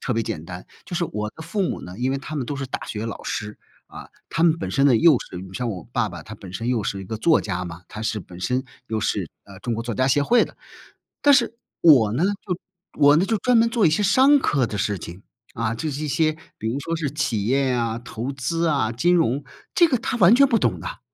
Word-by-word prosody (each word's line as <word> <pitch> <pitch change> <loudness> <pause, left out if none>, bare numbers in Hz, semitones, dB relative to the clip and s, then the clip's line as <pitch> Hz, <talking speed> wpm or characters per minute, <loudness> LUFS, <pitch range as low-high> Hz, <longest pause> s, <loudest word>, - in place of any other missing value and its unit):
特 120 - -2
别 115 - +1
简 100 -8 -5
单， 90 0 -8 0.2
就 175 - -4
是 170 - +1
我 105 -6 -4
的 160 - -8
父 195 +5 -2
母 - - -2
呢， 90 +2 -9
因 130 +2 0
为 135 - 0
他 155 +3 -7
们 130 -5 -2
都 145 - -4
是 135 -1 -4
大 - - -5
学 110 +1 -4
老 110 - -6
师， 105 0 -4 0.3
啊， - - -11 0.2
他 165 - 0
们 165 -1 +4
本 - - -4
身 140 0 +3
呢 125 -4 +5
又 155 -2 +6
是 90 - -9
你 95 +1 -8
像 125 +3 -3
我 95 -5 -5
爸 120 -3 +1
爸 85 -4 -9
他 110 - -9
本 95 -3 -11
身 115 +6 -3
又 120 -4 +1
是 100 0 -3
一 - - -9
个 110 +3 -5
作 165 +6 +4
家 90 -3 -3
嘛， 85 +1 -9
他 110 - -8
是 110 -1 -1
本 90 -2 -11
身 125 +8 -1 0.2
又 110 -1 -2
是， - - -1 0.2
呃， 100 -1 -13
中 120 -2 -2
国 115 - -3
作 120 -2 -4
家 130 +3 +1
协 145 +2 +3
会 240 +11 +4
的。 - - -14 0.7
但 285 -1 +7
是 235 -3 +2 0.3
我 125 -11 +6
呢 160 +8 +1
就 195 -2 -2 0.4
我 145 0 +7
呢 185 +4 +2
就 225 - +1
专 245 +2 +3
门 230 0 +4
做 230 -7 +3
一 - - +4
些 185 +7 +1
商 260 +9 +5
科 140 - +1
的 105 - -5
事 100 -1 -1
情， 85 +4 -9 0.3
啊， 115 0 -1
就 150 +7 -3
是 145 +2 -5
一 - - -3
些 155 +1 +1 0.2
比 110 - -5
如 135 +5 -2
说 165 +2 -3
是 150 -4 -2
企 120 -9 -1
业 135 +2 +2
呀、 115 -2 -1
投 120 +3 -5
资 165 +6 -1
啊、 135 -7 +1
金 175 +10 +2
融， 145 -4 +1 0.3
这 345 - +6
个 255 -7 +1
他 245 - -2
完 190 +4 +7
全 275 +2 +6
不 230 -4 +3
懂 - - 0
的 - - -8
啊！ - - -9
130 Hz, 290 characters per minute, -23 LUFS, 110-165 Hz, 0.7 s, 但